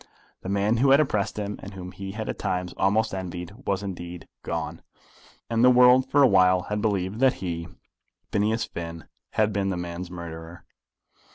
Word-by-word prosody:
The 95 - -6
man 100 +3 +2
who 135 +4 +3
had 135 +2 +7
oppressed 105 -11 0
him, 105 -1 -4
and 100 0 -9
whom 90 -1 -7
he 95 0 -7
had 110 +1 -5
at - - -4
times 90 -1 -2
almost 105 +3 +2
envied, 90 -1 -5
was 100 0 0
indeed 90 -3 -7
gone, - - -4 0.7
and 115 0 +1
the 125 - +8
world 125 +1 +6
for 145 0 +5
awhile 95 -6 +5
had 105 +3 -3
believed 100 -1 -1
that 130 -1 +5
he, 85 -2 -4 0.6
Phineas 110 +2 +1
Finn, 85 -1 -7 0.3
had 110 -1 +2
been 100 0 0
the 95 - -2
man's 85 0 -5
murderer! 85 -1 -8
95 Hz, 175 wpm, -26 LUFS, 90-110 Hz, 0.7 s, the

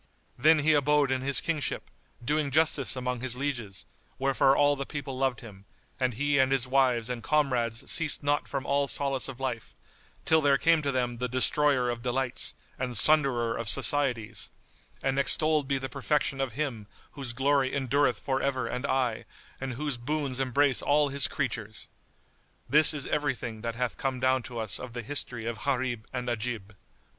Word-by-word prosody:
Then 155 +6 +4
he 155 +1 +3
abode 145 -1 +2
in 130 -1 -1
his 135 -1 +4
kingship, 160 -3 -3 0.3
doing 150 +2 0
justice 150 -2 +3
among 125 -1 -4
his 125 -1 +2
lieges, 115 -9 -4 0.3
wherefore 135 0 +2
all 145 0 +3
the 140 - -4
people 140 -2 -6
loved 130 -1 -1
him, 100 -4 -13 0.3
and 130 -3 -1
he 145 +2 +1
and 130 0 +3
his 130 -2 +1
wives 130 -3 +1
and 125 -2 -4
comrades 125 -5 0
ceased 155 -3 +3
not 145 +1 0
from 140 -1 -4
all 140 0 0
solace 135 -1 -1
of 135 -2 -9
life, 125 -4 -5 0.5
till 160 0 +3
there 140 -2 +3
came 165 +2 +3
to 140 -2 -1
them 125 -2 -2
the 125 +1 -3
Destroyer 130 0 +2
of 120 -1 -6
Delights 125 +1 -2 0.2
and 125 -3 -2
Sunderer 130 -4 +4
of 115 -2 -3
Societies, 115 -6 +3 0.5
and 135 0 0
extolled 155 +1 +3
be 135 -1 0
the 135 0 -5
perfection 140 +1 -1
of 130 -5 -3
Him 120 -6 -4 0.2
whose 135 -4 -7
glory 135 +1 +1
endureth 135 -1 +1
for 135 -1 -2
ever 130 -2 -1
and 125 +3 -4
aye 125 -5 -1 0.3
and 135 -1 -5
whose 145 +1 -3
boons 135 +1 -3
embrace 135 +1 +2
all 145 0 +2
His 140 0 +3
creatures! 110 -5 -4 0.8
This 150 +3 +7
is 145 -3 -3
every 145 -3 -1
thing 110 -3 -7
that 115 0 -4
hath 125 0 -3
come 135 -2 -3
down 130 0 +1
to 120 - -8
us 110 -6 -1
of 125 -2 -9
the 120 -1 -6
history 125 -3 -2
of 115 -1 -4
Gharib 130 -5 -2
and 125 -1 -5
Ajib. 115 -3 -4
130 Hz, 180 wpm, -27 LUFS, 120-145 Hz, 0.8 s, This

